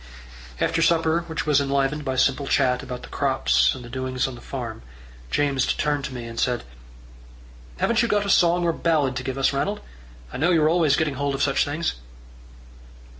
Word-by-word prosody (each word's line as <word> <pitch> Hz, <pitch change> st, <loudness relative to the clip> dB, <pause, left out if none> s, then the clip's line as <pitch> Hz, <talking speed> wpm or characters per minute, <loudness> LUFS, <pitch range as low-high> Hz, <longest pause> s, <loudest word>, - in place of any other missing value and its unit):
After -, -, +1 dB
supper, 165 Hz, 0 st, +2 dB
which 160 Hz, -4 st, -3 dB
was 145 Hz, -2 st, +3 dB
enlivened 140 Hz, +1 st, 0 dB
by 130 Hz, -2 st, -2 dB
simple 135 Hz, +2 st, +1 dB
chat 125 Hz, -3 st, +2 dB
about 125 Hz, -1 st, -7 dB
the -, -, -10 dB
crops 135 Hz, -1 st, +2 dB
and 125 Hz, -2 st, -9 dB
the -, -, -9 dB
doings 130 Hz, 0 st, -2 dB
on 135 Hz, -, -6 dB
the 120 Hz, -, -11 dB
farm, 120 Hz, -5 st, -6 dB, 0.5 s
James 140 Hz, -, +1 dB
turned 145 Hz, -2 st, -1 dB
to 135 Hz, -, -6 dB
me, 120 Hz, -1 st, -6 dB
and 115 Hz, 0 st, -7 dB
said: 125 Hz, -1 st, 0 dB, 1.1 s
"Haven't 235 Hz, -, +2 dB
you 235 Hz, -, +1 dB
got 205 Hz, -2 st, +1 dB
a -, -, -3 dB
song 175 Hz, 0 st, +4 dB
or 170 Hz, -, +2 dB
a -, -, -6 dB
ballad 150 Hz, -6 st, +1 dB
to 130 Hz, -, -4 dB
give 130 Hz, 0 st, -4 dB
us, 135 Hz, +1 st, +2 dB
Ranald? 200 Hz, +9 st, -1 dB, 0.5 s
I -, -, -4 dB
know 160 Hz, +7 st, +2 dB
you're 160 Hz, -3 st, +4 dB
always 160 Hz, -4 st, +3 dB
getting 155 Hz, -2 st, 0 dB
hold 140 Hz, +1 st, -2 dB
of 135 Hz, -, -1 dB
such 140 Hz, -, +2 dB
things." 155 Hz, +3 st, -2 dB
140 Hz, 200 wpm, -23 LUFS, 130-160 Hz, 1.1 s, song